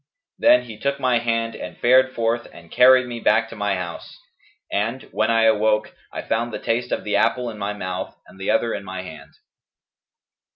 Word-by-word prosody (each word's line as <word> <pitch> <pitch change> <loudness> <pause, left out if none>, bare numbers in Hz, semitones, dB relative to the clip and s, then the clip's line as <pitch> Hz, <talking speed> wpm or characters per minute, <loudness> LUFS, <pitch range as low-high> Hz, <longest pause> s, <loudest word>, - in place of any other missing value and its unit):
Then 305 +2 +5
he 110 -2 -11
took 140 +2 -1
my 125 -3 +2
hand 115 -1 -1
and - - -8
fared 130 +1 +4
forth 115 +1 -1
and 85 -1 -15
carried 130 +1 +6
me 120 -1 -6
back 115 +1 +2
to 115 - -10
my 105 -2 -1
house; 90 -2 -7 0.5
and, 115 +6 -2
when 110 - 0
I 115 0 +3
awoke, 110 -1 +2 0.2
I - - -6
found 120 +1 -1
the - - -4
taste 120 +2 -2
of - - -2
the 105 - -1
apple 125 -2 +1
in 110 - -11
my 100 +1 -2
mouth 95 -2 -5
and 95 +2 -17
the 95 - -3
other 115 - +1
in - - -5
my 95 -1 -6
hand.' 75 -5 -12
115 Hz, 200 wpm, -22 LUFS, 105-120 Hz, 0.5 s, carried